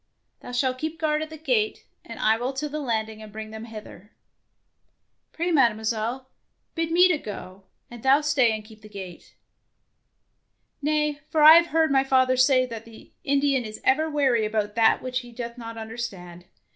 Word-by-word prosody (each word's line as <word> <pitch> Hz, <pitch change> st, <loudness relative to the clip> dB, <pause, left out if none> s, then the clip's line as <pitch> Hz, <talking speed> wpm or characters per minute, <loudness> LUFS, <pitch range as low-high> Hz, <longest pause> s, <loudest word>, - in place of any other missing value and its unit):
Thou -, -, -10 dB
shalt 255 Hz, +1 st, -1 dB
keep 315 Hz, +2 st, -4 dB
guard 305 Hz, -1 st, 0 dB
at 315 Hz, -, -5 dB
the 315 Hz, -, -9 dB
gate, 430 Hz, +7 st, -1 dB, 0.2 s
and -, -, -10 dB
I 220 Hz, +1 st, +3 dB
will 245 Hz, +4 st, -3 dB
to 285 Hz, +3 st, -3 dB
the 300 Hz, +1 st, -5 dB
landing 220 Hz, -5 st, -3 dB
and 215 Hz, -1 st, -11 dB
bring 215 Hz, 0 st, -8 dB
them 220 Hz, +1 st, -8 dB
hither/' 210 Hz, -2 st, -11 dB, 1.2 s
^^Pray, 340 Hz, +1 st, -2 dB
Mademoiselle, 230 Hz, -1 st, 0 dB, 0.5 s
bid 330 Hz, -1 st, -2 dB
me 355 Hz, +2 st, +6 dB
to 355 Hz, -5 st, +1 dB
go, 195 Hz, -3 st, -9 dB, 0.2 s
and 240 Hz, -1 st, -11 dB
thou 270 Hz, +4 st, +4 dB
stay 290 Hz, -6 st, +2 dB
and 215 Hz, -1 st, -5 dB
keep 215 Hz, -1 st, -16 dB
the 215 Hz, -, -13 dB
gate/' 190 Hz, -4 st, -10 dB, 1.5 s
"Nay, 300 Hz, 0 st, 0 dB
for 310 Hz, -1 st, +2 dB
I 310 Hz, +1 st, +11 dB
have 340 Hz, 0 st, +3 dB
heard 320 Hz, -1 st, +1 dB
my 270 Hz, -1 st, +4 dB
father 260 Hz, -1 st, +3 dB
say 255 Hz, 0 st, +4 dB
that 230 Hz, -2 st, -8 dB
the 225 Hz, -1 st, -15 dB
Indian 275 Hz, -2 st, +1 dB
is 215 Hz, -1 st, -8 dB
ever 310 Hz, +4 st, +2 dB
wary 270 Hz, -7 st, +2 dB
about 210 Hz, -1 st, -1 dB
that 225 Hz, 0 st, +3 dB
which 255 Hz, 0 st, -2 dB
he 245 Hz, -1 st, -12 dB
doth 235 Hz, 0 st, -7 dB
not 230 Hz, -2 st, -8 dB
understand. 205 Hz, -6 st, -7 dB
250 Hz, 185 wpm, -25 LUFS, 220-300 Hz, 1.5 s, I